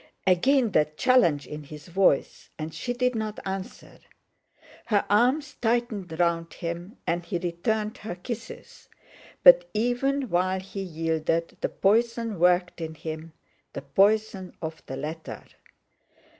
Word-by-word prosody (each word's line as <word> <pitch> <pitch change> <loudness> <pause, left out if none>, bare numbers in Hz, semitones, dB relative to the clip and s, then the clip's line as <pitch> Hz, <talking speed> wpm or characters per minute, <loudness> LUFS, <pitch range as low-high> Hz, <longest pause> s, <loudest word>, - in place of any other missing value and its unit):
Again 235 +6 +3
that 150 -2 +1
challenge 175 - +3
in 150 -1 -8
his 150 0 -11
voice, 180 -5 +1
and 155 0 -5
she 165 +10 -4
did 250 +1 +1
not 215 -2 -3
answer. 190 0 -6 0.9
Her 210 -3 +2
arms 265 +7 +2
tightened 225 -8 -1
round 170 -1 +1
him, 170 +5 -6
and 175 +1 -1
he 175 +1 -3
returned 210 +5 -2
her 210 -4 -6
kisses; 230 +5 -8 0.5
but - - +8
even 255 +4 0
while 185 +2 +1
he 195 +1 -7
yielded, 165 -1 -1
the - - 0
poison 230 0 +1
worked 180 0 +2
in 160 -1 -5
him, 160 +1 -7 0.4
the 140 - -6
poison 195 +5 +1
of 160 0 -6
the 135 - -5
letter. 155 +3 -6
185 Hz, 130 wpm, -26 LUFS, 165-230 Hz, 0.9 s, but